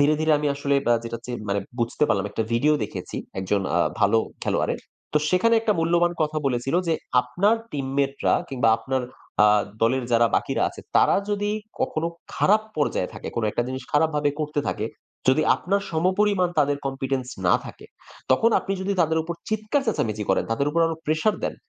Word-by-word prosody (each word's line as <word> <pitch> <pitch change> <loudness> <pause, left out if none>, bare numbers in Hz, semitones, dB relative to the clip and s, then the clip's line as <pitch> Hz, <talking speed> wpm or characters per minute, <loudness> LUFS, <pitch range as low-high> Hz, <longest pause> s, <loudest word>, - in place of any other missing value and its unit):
ধীরে 150 +2 +4
ধীরে 155 0 +3
আমি 150 - -1
আসলে 140 0 0
ব্যা 120 0 +4
যেটা 115 0 -4
চিন 120 -1 -4
মানে 100 0 +1 0.2
বুঝতে 120 +4 -1
পারলাম। 95 - +1
একটা 110 - -1
ভিডিও 145 +6 +3
দেখেছি - - -7 0.2
একজন 100 +2 0 0.2
আ - - +4 0.2
ভালো 115 - +4 0.3
খেলোয়াড়ের। - - 0 0.3
তো 150 - +4
সেখানে 230 +6 +3
একটা 220 -1 +2
মূল্যবান 170 +1 +2
কথা 155 0 -1
বলেছিল 130 +2 -1
যে, 165 - +3 0.3
"আপনার 180 - +2 0.2
টিমমেটরা 140 0 0
কিংবা 125 -4 +1
আপনার 130 +3 -2 0.4
আ - - +7 0.4
দলের 125 +2 +2
যারা 115 0 +5
বাকিরা - - -1
আছে - - -11 0.2
তারা - - +5
যদি 205 0 0 0.3
কখনো 160 +1 0 0.3
খারাপ 215 +2 +3
পর্যায়ে 145 -10 0
থাকে, - - -7
কোন 115 - 0
একটা 120 - 0
জিনিস 130 0 -4
খারাপভাবে 150 -1 +2
করতে 150 -1 -1
থাকে, 110 - -2 0.4
যদি 135 +4 +5
আপনার 200 +2 -1
সমপরিমাণ 185 +3 +2
তাদের 145 -1 +3
Competence 135 -1 -2 0.2
না 90 - +5
থাকে, - - -11 0.4
তখন 225 - +4
আপনি 195 - -4
যদি 200 +1 -1
তাদের 160 -1 +2
উপর 170 +1 -5
চিৎকার 215 +6 0
চেঁচামেচি 110 - -1
করেন, - - +2
তাদের 140 +5 0
উপর 170 - +1
আরো 165 - -1
প্রেশার 155 +8 +2
দেন, - - -2
145 Hz, 180 wpm, -24 LUFS, 125-175 Hz, 0.4 s, আ